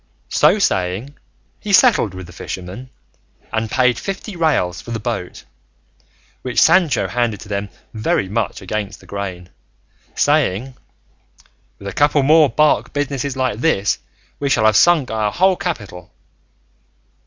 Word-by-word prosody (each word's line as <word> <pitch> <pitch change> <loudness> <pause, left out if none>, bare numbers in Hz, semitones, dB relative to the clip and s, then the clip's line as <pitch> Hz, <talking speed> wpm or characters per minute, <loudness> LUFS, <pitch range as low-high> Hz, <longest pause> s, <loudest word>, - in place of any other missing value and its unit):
So - - +4
saying 100 - -1 0.4
he 210 - -5
settled 195 - +4
with 95 -1 -8
the 90 - -13
fishermen, 95 +8 -7 0.6
and 110 0 -1
paid 125 0 +2
fifty 195 +1 -6
reals 150 - 0
for - - -12
the 115 -1 -3
boat, 110 -6 -5 1.0
which 125 -2 -1
Sancho 175 -6 +4
handed 120 -4 -1
to - - -11
them 100 0 -3 0.2
very 110 -3 0
much 105 0 -3
against 100 +1 -4
the - - -18
grain, 95 -3 -6 0.7
saying, 135 -5 +1 1.0
"With 100 - -10
a 100 - -5
couple 145 -1 +3
more 155 +1 +5
bark 150 +6 +2
businesses 140 -1 -2
like 130 -5 -1
this 105 -9 +1 0.4
we 140 - -1
shall 110 - +2
have 110 -1 +4
sunk 160 -3 +4
our 110 -2 0
whole 190 - +3
capital." 105 - -6
120 Hz, 140 wpm, -19 LUFS, 100-145 Hz, 1.0 s, more